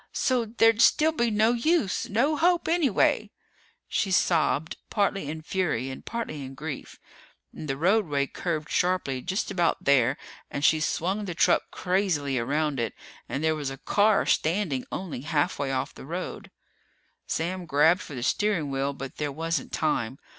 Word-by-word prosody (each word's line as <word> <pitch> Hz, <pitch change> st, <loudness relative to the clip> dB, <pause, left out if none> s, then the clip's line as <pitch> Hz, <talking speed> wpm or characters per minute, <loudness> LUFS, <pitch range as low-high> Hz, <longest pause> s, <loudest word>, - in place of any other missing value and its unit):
"So 250 Hz, -3 st, +1 dB
there'd 225 Hz, 0 st, +3 dB
still 310 Hz, +6 st, +5 dB
be 240 Hz, -7 st, 0 dB
no 215 Hz, +1 st, +3 dB
use. 245 Hz, -, +1 dB
No 265 Hz, +9 st, +2 dB
hope, 345 Hz, +3 st, +2 dB
anyway." 325 Hz, -, +2 dB, 0.6 s
She 195 Hz, -, 0 dB
sobbed, 165 Hz, -4 st, +1 dB
partly 195 Hz, -7 st, 0 dB
in 155 Hz, +1 st, -6 dB
fury 155 Hz, -8 st, -1 dB
and 130 Hz, -, -9 dB
partly 225 Hz, -11 st, -4 dB
in 135 Hz, 0 st, -8 dB
grief. 150 Hz, 0 st, -7 dB, 0.5 s
And 155 Hz, -, -7 dB
the 135 Hz, -, -1 dB
roadway 165 Hz, -5 st, +2 dB
curved 155 Hz, +1 st, -3 dB
sharply 175 Hz, -8 st, 0 dB
just 190 Hz, +6 st, -2 dB
about 175 Hz, -3 st, +1 dB
there 135 Hz, -4 st, +3 dB, 0.3 s
and 140 Hz, +1 st, -2 dB
she 160 Hz, -, +5 dB
swung 190 Hz, +6 st, -1 dB
the 175 Hz, -3 st, -5 dB
truck -, -, +3 dB
crazily 180 Hz, -8 st, 0 dB
around 145 Hz, +3 st, 0 dB
it 115 Hz, -, -2 dB, 0.3 s
and 140 Hz, -, -3 dB
there 160 Hz, 0 st, +3 dB
was 150 Hz, -3 st, -3 dB
a 135 Hz, -, -7 dB
car 205 Hz, +7 st, +2 dB
standing 160 Hz, -6 st, 0 dB
only 175 Hz, -9 st, -5 dB
halfway 145 Hz, -2 st, 0 dB
off 130 Hz, -, -2 dB
the -, -, -11 dB
road. 175 Hz, +3 st, -5 dB, 0.8 s
Sam 175 Hz, +2 st, -2 dB
grabbed 160 Hz, +5 st, +4 dB
for 145 Hz, -, -8 dB
the 120 Hz, -, -4 dB
steering 175 Hz, -2 st, 0 dB
wheel, 135 Hz, +1 st, -1 dB
but 135 Hz, -1 st, -8 dB
there 150 Hz, -1 st, -2 dB
wasn't 165 Hz, 0 st, -2 dB
time. 130 Hz, -5 st, -1 dB
165 Hz, 160 wpm, -26 LUFS, 140-205 Hz, 0.8 s, still